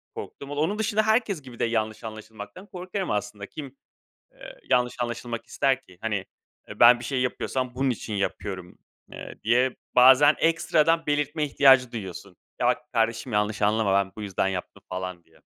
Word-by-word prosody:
korktum. 140 0 -8
O - - -4
onun 165 +9 0
dışında 215 0 +1
herkes 220 -7 +1
gibi 125 -3 -13
de - - +2
yanlış 110 -2 -2
anlaşılmaktan 110 - -9
korkarım 185 +1 -4
aslında. 105 0 -3
Kim, 140 +3 -9 0.6
eee, - - -12
yanlış 125 -1 +2
anlaşılmak 120 -1 -4
ister 135 -1 0
ki? 90 -1 -19
Hani, 105 -4 -2 0.4
eee, - - -10
"Ben 120 0 +8
bir 120 - -7
şey 130 0 -1
yapıyorsam, 125 0 -2
bunun 135 +1 +1
için 115 -2 -4
yapıyorum." 95 -2 -4 0.3
eee, - - -9
diye 125 +3 +2 0.2
bazen 130 +4 +7
ekstradan 165 0 +2
belirtme 145 +1 0
ihtiyacı 135 -3 +5
duyuyorsun. 100 -3 -7 0.2
"Ya, - - +2
bak, - - +3 0.2
kardeşim, 115 +1 0
yanlış 105 0 0
anlama 105 -1 +2
ben 95 -1 +2
bu 110 - -8
yüzden 100 -2 -1
yaptım." 95 -2 -5
falan 90 -1 -5
diye. - - -26
120 Hz, 170 wpm, -25 LUFS, 105-145 Hz, 0.6 s, Ben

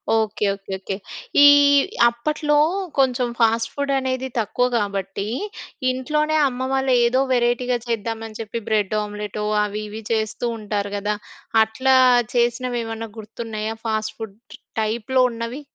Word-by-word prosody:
Okay. 215 -1 0
Okay 195 0 -12
okay. 195 0 -4 0.5
ఈ - - +10 0.6
అప్పట్లో 295 +5 0 0.4
కొంచెం 255 -2 +2
ఫాస్ట్ 230 0 +3
ఫుడ్ 280 -1 -2
అనేది 260 0 -2
తక్కువ 245 +3 +1
కాబట్టి, 200 -1 -3 0.6
ఇంట్లోనే 300 +4 0
అమ్మ 260 0 -3
వాళ్ళు 265 -1 +2
ఏదో 255 +3 +2
వెరైటీగా 245 0 +1
చేద్దామని 225 -1 -3
చెప్పి. 225 +1 -4
బ్రెడ్ 210 -1 +1
ఆమ్లెట్ 210 0 -6 0.2
అవి 210 +1 -3
ఇవి 220 +1 -7
చేస్తూ 220 +2 -1
ఉంటారు 205 -1 -3
కదా! 210 +1 -1 0.5
అట్లా 260 +4 +2 0.4
చేసినవేమన్నా 235 -2 -1
గుర్తున్నాయా 220 0 -5
ఫాస్ట్ 220 -1 -2
ఫుడ్ 215 -2 -7 0.4
టైప్‌లో 235 +4 +1
ఉన్నవి? 230 +5 -5
225 Hz, 120 wpm, -22 LUFS, 215-255 Hz, 0.6 s, ఈ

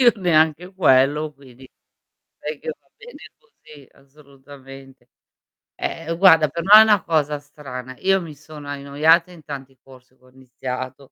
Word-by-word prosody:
Io 245 -2 +6
neanche 170 0 +1
quello 150 -2 +2
quindi, 130 -2 -17 0.7
direi 150 0 -6
che - - -10
va - - -38
bene 485 0 -14 0.2
così, 155 - -19
assolutamente. 135 -2 -17 0.7
Eh 165 0 -5
guarda 165 -5 +6
per 170 +3 -5
me 195 - -2
è - - +9
una 210 -3 +3
cosa 150 -2 -1
strana, 130 -3 -10
io 195 0 +1
mi 160 -4 -10
sono 150 0 -13
annoiata 145 +5 +1
in 165 -3 -15
tanti 135 -2 -9
corsi 130 -1 -19
che - - -34
ho - - -21
iniziato. 130 +1 -8
145 Hz, 150 wpm, -21 LUFS, 135-165 Hz, 0.7 s, è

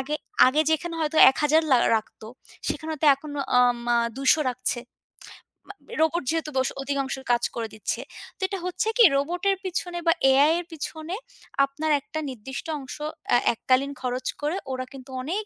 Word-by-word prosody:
আগে, 290 +3 -3 0.3
আগে 290 +4 +3
যেখানে 335 +2 -1
হয়তো 310 0 -1
১০০০ 300 +3 +2
লা 260 - +7 0.2
রাখত 215 - -7 0.5
সেখানে 320 0 -3
হয়তো 310 0 -1
এখন, 295 +2 -10 0.3
আ - - +7
উম 240 0 -6 0.3
২০০ 270 +1 +4 0.2
রাখছে। 250 0 -2 1.2
রোবট 320 +1 +2
যেহেতু 320 -1 -1
বশ 260 0 +2
অধিকাংশ 275 -1 -2 0.2
কাজ 240 0 +2
করে 230 -1 -3
দিচ্ছে। 215 - -3 0.4
তো - - -19
এটা 390 -1 -4
হচ্ছে 365 +4 -2
কি 475 - +7
রোবটের 355 +7 0
পিছনে 355 -1 -3
বা 330 - +6 0.2
এআই 280 +3 +5
এর 350 - -6
পিছনে, 315 +2 -5 0.5
আপনার 300 +3 -3
একটা 315 - -6
নির্দিষ্ট 260 +1 -7
অংশ 265 -2 -8 0.4
এ - - +7 0.2
এককালীন 260 +4 +1
খরচ 255 0 -3
করে 300 +4 -1 0.2
ওরা 255 0 -3
কিন্তু 265 0 -11
অনেক 375 +11 -3
290 Hz, 165 wpm, -25 LUFS, 260-325 Hz, 1.2 s, লা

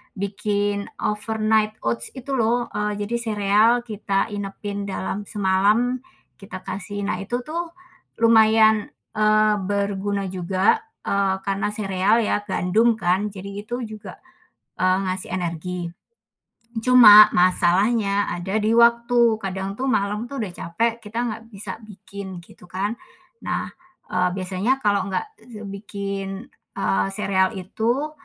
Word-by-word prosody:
bikin 200 +1 -2 0.2
overnight 215 0 0
oats 115 0 -1
itu 260 +2 -7
lho, 240 0 +1
eee, 210 0 -2
jadi 235 +3 -3
sereal 210 0 +3 0.2
kita 200 -1 -1
inepin 205 0 -5
dalam 195 +1 -4
semalam, 210 +5 +2 0.4
kita 195 -2 -9
kasih. 200 +2 -5
Nah, 190 -2 -2
itu 240 +5 -3
tuh, 335 +2 -4 0.5
lumayan, 220 -1 +5 0.3
eee. 215 0 +3
berguna 200 0 -1
juga, 185 - +1 0.3
eee, 195 -1 +1
karena 195 +1 -1
sereal 205 +2 +1
ya, 210 - +1
gandum 220 +6 +2
kan, 190 +1 +1
jadi 200 +2 -8
itu 245 +1 -3
juga, 215 0 -9 0.6
eee, 185 0 +3
ngasih 185 0 -3
energi. 175 0 -4 0.9
Cuma 220 -5 +9
masalahnya 200 +4 +2
ada 190 +5 -2
di 215 +1 +1
waktu, 235 -1 +4
kadang 195 +1 -4
tuh 265 - -1
malam 210 +2 -1
tuh 280 - -6
udah 185 - -5
capek, 225 +7 -1
kita 220 +3 -5
nggak 225 0 -5
bisa 205 +2 -6
bikin, 195 -2 -9
gitu 180 - -17
kan. 200 +5 -2 0.5
Nah, - - -3 0.4
eee, 180 0 +2
biasanya 195 +8 -1
kalau 200 -2 +1
nggak 195 - -2 0.4
bikin, 200 +2 -6 0.3
eee, 95 0 +1
sereal 190 +1 +1
itu, 235 +10 -2
205 Hz, 125 wpm, -22 LUFS, 190-220 Hz, 0.9 s, Cuma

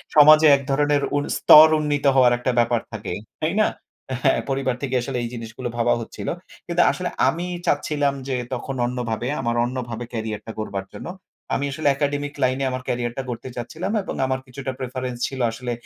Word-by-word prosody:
সমাজে 155 +1 +8
এক 140 - -3
ধরণের 145 +1 +2
উন 145 - +1
স্তর 155 +1 +9
উন্নীত 145 -1 -1
হওয়ার 125 -2 +6
একটা 125 +1 -1
ব্যাপার 120 0 +2
থাকে। 105 -4 -5 0.3
তাই 160 +2 0
না? - - +4 0.6
হ্যাঁ, 135 - +4
পরিবার 135 -2 0
থেকে 130 -2 -1
আসলে 125 +1 -3
এই 120 - -3
জিনিসগুলো 115 +1 -6
ভাবা 120 0 +3
হচ্ছিল। 115 - -8 0.4
কিন্তু 175 0 +2
আসলে 180 -1 -3 0.2
আমি 170 +2 0 0.2
চাচ্ছিলাম 145 -2 +1
যে 135 - -1 0.2
তখন 130 +2 -4
অন্যভাবে, 120 -1 -3
আমার 120 -1 -1
অন্যভাবে 120 -2 -4
ক্যারিয়ারটা 110 -1 -4
গড়বার 100 -3 -4
জন্য। - - -8 0.5
আমি 140 - 0
আসলে 145 +2 -2
একাডেমিক 145 0 -1
লাইনে 130 +1 +1
আমার 130 0 -3
ক্যারিয়ারটা 120 +1 -2
গড়তে 120 +1 -5
চাচ্ছিলাম। 155 - -4
এবং - - -5
আমার 130 0 -1
কিছুটা 130 +1 -6
প্রেফারেন্স 130 -1 -4
ছিল 135 - -7
আসলে, 120 +2 -5
130 Hz, 175 wpm, -23 LUFS, 120-145 Hz, 0.6 s, স্তর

